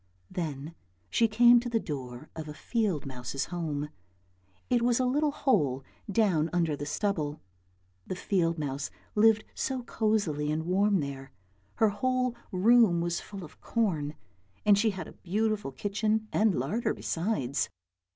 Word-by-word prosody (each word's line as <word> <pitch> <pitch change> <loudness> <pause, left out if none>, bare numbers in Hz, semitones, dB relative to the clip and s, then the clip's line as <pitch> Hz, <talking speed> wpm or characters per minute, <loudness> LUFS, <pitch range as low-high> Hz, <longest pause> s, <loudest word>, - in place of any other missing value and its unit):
Then 155 -2 -4 0.4
she 230 - +4
came 240 +2 +7
to 240 +1 -4
the 230 -1 +1
door 130 - -6
of 160 -1 -6
a 150 - -7
field 210 - -1
mouse's 130 +1 -4
home. 150 -4 -2 0.8
It 245 -1 +2
was 240 0 +3
a 255 - +2
little 295 +4 +2
hole 145 - +1 0.3
down 185 -7 +2
under 165 -4 +1
the 145 0 -5
stubble. 155 -4 -1 0.7
The - - -3
field 170 -3 0
mouse 140 -2 -3 0.2
lived 220 +1 +5
so 260 -2 -2
cosily 200 -11 0
and 160 +1 -1
warm 195 +1 +3
there, 140 -1 -6 0.4
her 220 - +4
whole 255 +4 0 0.2
room 210 -1 +5
was 170 0 -1
full 200 -2 -8
of 155 - -13
corn, 160 -10 0 0.5
and 205 -1 +7
she 220 +2 +3
had 190 -3 -5
a - - -10
beautiful 210 -3 -1
kitchen 215 +6 -1
and 210 -4 +3
larder 150 - -1
besides. 165 - -1
185 Hz, 150 wpm, -29 LUFS, 150-220 Hz, 0.8 s, came